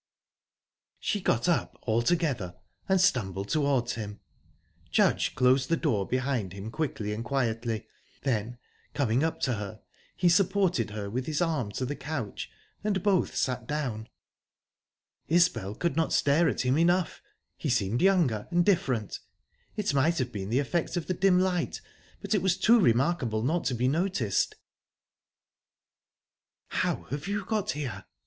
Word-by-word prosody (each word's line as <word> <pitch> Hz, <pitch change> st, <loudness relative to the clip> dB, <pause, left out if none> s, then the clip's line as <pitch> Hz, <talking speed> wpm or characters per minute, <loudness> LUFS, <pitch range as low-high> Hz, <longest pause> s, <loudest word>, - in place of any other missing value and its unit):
She 205 Hz, -, -1 dB
got 120 Hz, -3 st, +1 dB
up 175 Hz, -, 0 dB
altogether, 120 Hz, -, 0 dB, 0.3 s
and 190 Hz, 0 st, +4 dB
stumbled 100 Hz, -, +1 dB
towards 140 Hz, -5 st, +1 dB
him. 105 Hz, -2 st, -6 dB, 0.7 s
Judge -, -, +2 dB
closed 130 Hz, +1 st, +3 dB
the 165 Hz, -, +2 dB
door 110 Hz, -, 0 dB
behind 125 Hz, -7 st, -1 dB
him 100 Hz, +3 st, -7 dB
quickly 115 Hz, -8 st, -2 dB
and 110 Hz, +2 st, -4 dB
quietly; 115 Hz, -4 st, -1 dB, 0.4 s
then, 120 Hz, -2 st, -1 dB, 0.4 s
coming 130 Hz, -1 st, +1 dB
up 160 Hz, -, -1 dB
to 125 Hz, -, +1 dB
her, 105 Hz, 0 st, -6 dB, 0.3 s
he 180 Hz, -, +3 dB
supported 180 Hz, -, +2 dB
her 105 Hz, -1 st, -5 dB
with 125 Hz, +5 st, -3 dB
his 155 Hz, -1 st, -1 dB
arm 155 Hz, -, 0 dB
to 130 Hz, -, -2 dB
the 145 Hz, +3 st, -3 dB
couch, 140 Hz, -10 st, -5 dB, 0.3 s
and 200 Hz, -3 st, 0 dB
both 195 Hz, -4 st, +2 dB
sat 125 Hz, -3 st, -1 dB
down. 120 Hz, -7 st, -3 dB, 1.2 s
Isbel 165 Hz, -, +2 dB
could 170 Hz, +2 st, -1 dB
not 160 Hz, 0 st, +1 dB
stare 150 Hz, +4 st, +3 dB
at -, -, -1 dB
him 130 Hz, +4 st, +2 dB
enough. 175 Hz, +1 st, +2 dB, 0.3 s
He 150 Hz, -, -3 dB
seemed 115 Hz, -2 st, +1 dB
younger, 170 Hz, -, +3 dB
and 175 Hz, 0 st, +2 dB
different. 130 Hz, -, +1 dB, 0.6 s
It 205 Hz, -7 st, -1 dB
might 155 Hz, +5 st, +2 dB
have 125 Hz, -2 st, -1 dB
been 100 Hz, -2 st, -5 dB
the 120 Hz, -, +1 dB
effect 160 Hz, +5 st, -1 dB
of 170 Hz, -, -2 dB
the 185 Hz, -, -1 dB
dim 185 Hz, 0 st, +3 dB
light, 180 Hz, -2 st, 0 dB, 0.4 s
but 200 Hz, +1 st, -2 dB
it 205 Hz, -, +2 dB
was 185 Hz, -1 st, +2 dB
too 230 Hz, +5 st, +5 dB
remarkable 120 Hz, -, +2 dB
not 165 Hz, +7 st, 0 dB
to 125 Hz, 0 st, 0 dB
be 125 Hz, +2 st, +1 dB
noticed. 145 Hz, -, 0 dB, 2.1 s
"How -, -, -1 dB
have 145 Hz, +5 st, -4 dB
you 200 Hz, 0 st, -2 dB
got 215 Hz, -2 st, -1 dB
here?" 120 Hz, -10 st, -5 dB
135 Hz, 150 wpm, -28 LUFS, 115-175 Hz, 2.1 s, too